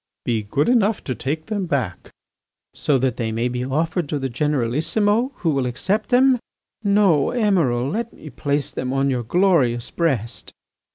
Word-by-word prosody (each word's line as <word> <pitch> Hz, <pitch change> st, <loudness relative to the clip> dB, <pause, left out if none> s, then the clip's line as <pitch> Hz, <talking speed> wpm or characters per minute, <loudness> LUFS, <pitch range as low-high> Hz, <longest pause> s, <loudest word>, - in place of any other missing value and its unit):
"Be 115 Hz, -2 st, 0 dB
good 135 Hz, +8 st, 0 dB
enough 225 Hz, -4 st, +2 dB
to 130 Hz, -, -2 dB
take 155 Hz, +5 st, -3 dB
them 205 Hz, -4 st, -2 dB
back." 125 Hz, -, -2 dB, 0.6 s
"So 145 Hz, -, +1 dB
that 130 Hz, -1 st, 0 dB
they 115 Hz, -2 st, -2 dB
may 115 Hz, +2 st, 0 dB
be 125 Hz, 0 st, -3 dB
offered 160 Hz, +4 st, -1 dB
to 150 Hz, -, -1 dB
the 135 Hz, -1 st, -2 dB
Generalissimo 150 Hz, -, +1 dB
who 165 Hz, -, 0 dB
will 135 Hz, -3 st, 0 dB
accept 190 Hz, -, -1 dB
them!... 255 Hz, 0 st, +4 dB, 0.4 s
No, 200 Hz, -8 st, +3 dB
Emiral, 170 Hz, -, +1 dB
let 230 Hz, +8 st, -3 dB
me 155 Hz, -, -12 dB
place 145 Hz, +2 st, -1 dB
them 130 Hz, 0 st, -3 dB
on 135 Hz, 0 st, +1 dB
your 125 Hz, -2 st, 0 dB
glorious 130 Hz, -, +2 dB
breast." 135 Hz, -10 st, -2 dB
145 Hz, 165 wpm, -22 LUFS, 125-195 Hz, 0.6 s, them